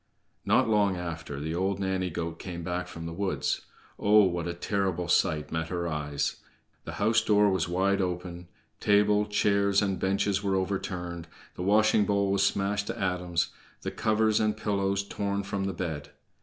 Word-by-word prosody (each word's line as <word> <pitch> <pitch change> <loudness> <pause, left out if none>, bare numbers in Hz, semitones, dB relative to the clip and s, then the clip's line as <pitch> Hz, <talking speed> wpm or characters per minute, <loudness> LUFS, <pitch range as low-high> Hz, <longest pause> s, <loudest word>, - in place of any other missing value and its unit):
Not - - +4
long 105 -4 +2
after 85 -5 -5
the 80 +2 -3
old 95 +3 0
nanny 95 -1 -1
goat 85 0 -4
came 85 -2 -6
back 90 +1 -3
from 80 0 -8
the 85 - -5
woods. 95 +2 -2 0.3
Oh, 105 +1 +6
what 85 -2 0
a 85 - -3
terrible 95 -2 -1
sight 75 -1 +1
met 80 0 -2
her 85 0 -2
eyes! 75 -3 -2 0.5
The - - -6
house 110 +2 +2
door 105 -1 +4
was 95 -2 0
wide 95 +2 +2
open, 90 -1 -4 0.3
table, 105 0 +3
chairs, 100 -1 +2
and 100 -2 0
benches 100 +1 +1
were 100 -1 0
overturned, 90 -3 -3 0.3
the - - -7
washing 105 +2 +4
bowl 100 -1 +2
was 100 0 +2
smashed 100 +1 +1
to 115 - -4
atoms, 90 -3 0 0.3
the - - -3
covers 110 0 +2
and 110 -1 +1
pillows 100 -1 -1
torn 100 0 -2
from 100 0 -3
the 95 - -1
bed. 80 -5 -4
95 Hz, 170 wpm, -28 LUFS, 85-100 Hz, 0.5 s, Oh